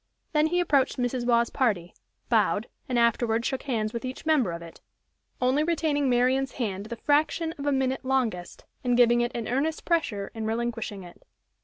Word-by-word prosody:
Then 305 Hz, 0 st, +4 dB
he 355 Hz, +2 st, +1 dB
approached 285 Hz, -7 st, +2 dB
Mrs. 245 Hz, -1 st, -1 dB
Waugh's 235 Hz, -1 st, +3 dB
party, 200 Hz, -10 st, 0 dB, 0.3 s
bowed, -, -, +2 dB, 0.2 s
and 250 Hz, -, 0 dB
afterward 235 Hz, 0 st, +2 dB
shook 265 Hz, -, -1 dB
hands 220 Hz, -6 st, -2 dB
with 235 Hz, -, -4 dB
each 255 Hz, +3 st, -6 dB
member 290 Hz, -, +3 dB
of 170 Hz, 0 st, -6 dB
it, 165 Hz, -, -13 dB, 0.6 s
only 260 Hz, +3 st, +2 dB
retaining 310 Hz, -4 st, +1 dB
Marian's 255 Hz, +1 st, +2 dB
hand 205 Hz, -5 st, -3 dB
the 235 Hz, -, -5 dB
fraction 310 Hz, +5 st, +1 dB
of 280 Hz, -, -4 dB
a -, -, +3 dB
minute 265 Hz, -1 st, 0 dB
longest, 245 Hz, -9 st, -2 dB, 0.2 s
and 245 Hz, -1 st, +2 dB
giving 240 Hz, -1 st, +5 dB
it 240 Hz, 0 st, 0 dB
an 235 Hz, -2 st, -3 dB
earnest 290 Hz, +6 st, -1 dB
pressure 235 Hz, -, 0 dB
in 220 Hz, -1 st, -4 dB
relinquishing 225 Hz, -3 st, -3 dB
it. 175 Hz, -, -14 dB
245 Hz, 180 wpm, -27 LUFS, 225-275 Hz, 0.6 s, giving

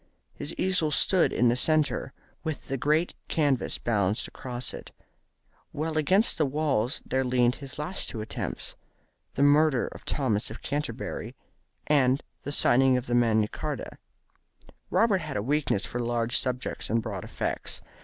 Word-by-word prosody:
His 145 Hz, -, -3 dB
easel 185 Hz, -4 st, +1 dB
stood 180 Hz, +4 st, +3 dB
in 120 Hz, 0 st, +3 dB
the 120 Hz, -, +2 dB
centre, 150 Hz, -1 st, +1 dB, 0.3 s
with 160 Hz, -3 st, -5 dB
the 135 Hz, -, 0 dB
great 155 Hz, +6 st, +1 dB
canvas 145 Hz, -5 st, +1 dB
balanced 105 Hz, -3 st, 0 dB
across 125 Hz, -1 st, -4 dB
it, -, -, -8 dB, 0.8 s
while 155 Hz, +2 st, -2 dB
against 185 Hz, +6 st, +3 dB
the 155 Hz, -, +4 dB
walls 135 Hz, -4 st, 0 dB
there 130 Hz, 0 st, 0 dB
leaned 125 Hz, -1 st, +3 dB
his 135 Hz, -1 st, -7 dB
two -, -, -4 dB
last 180 Hz, -6 st, -4 dB
attempts, 110 Hz, 0 st, -4 dB, 0.6 s
"The 140 Hz, -, +2 dB
Murder 145 Hz, -2 st, +4 dB
of -, -, -12 dB
Thomas 115 Hz, -8 st, 0 dB
of 110 Hz, -, -9 dB
Canterbury" 145 Hz, -5 st, -4 dB, 0.5 s
and 135 Hz, -2 st, +3 dB, 0.2 s
"The 145 Hz, -, -5 dB
Signing 130 Hz, -2 st, +4 dB
of 125 Hz, 0 st, -5 dB
Magna 115 Hz, -3 st, +3 dB
Charta." -, -, -5 dB, 0.9 s
Robert 210 Hz, -5 st, +3 dB
had 155 Hz, -4 st, -4 dB
a 100 Hz, -, -1 dB
weakness 140 Hz, -6 st, 0 dB
for 120 Hz, -, -4 dB
large 120 Hz, 0 st, 0 dB
subjects 125 Hz, -1 st, -1 dB
and 115 Hz, -, +2 dB
broad 105 Hz, -5 st, -5 dB
effects. -, -, -3 dB
130 Hz, 150 wpm, -27 LUFS, 120-150 Hz, 0.9 s, the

